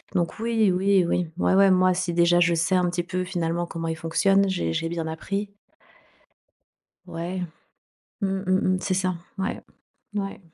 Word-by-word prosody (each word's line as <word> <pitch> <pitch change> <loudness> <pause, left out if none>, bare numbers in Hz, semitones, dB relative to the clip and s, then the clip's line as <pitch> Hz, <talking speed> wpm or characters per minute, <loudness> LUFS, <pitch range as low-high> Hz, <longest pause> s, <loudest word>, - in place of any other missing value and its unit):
donc, 175 +4 -1
oui, 225 -4 +2
oui, 190 0 +3
oui, 175 -1 0
ouais, 190 - +2
ouais, 195 0 +6
moi 185 0 +4
si 180 -1 -2
déjà, 175 0 +4
je 170 0 +4
sais 165 +3 +1
un 180 -1 +2
petit 175 0 -2
peu, 185 +1 -3
finalement, 175 -1 -2
comment 165 -1 -5
il 160 - -2
fonctionne, 195 +5 +2
j'ai 85 - -1
j'ai 165 - -1
bien 165 -1 -3
appris. 200 +6 -4 1.6
Ouais, 175 +2 -5 0.8
mmh 195 - +1
mh, 190 0 0
mmh. 185 - -3
C'est 190 - -1
ça. 185 -1 0 0.2
Ouais, 190 - -3 0.5
ouais. 195 -1 -4
180 Hz, 170 wpm, -25 LUFS, 170-195 Hz, 1.6 s, ouais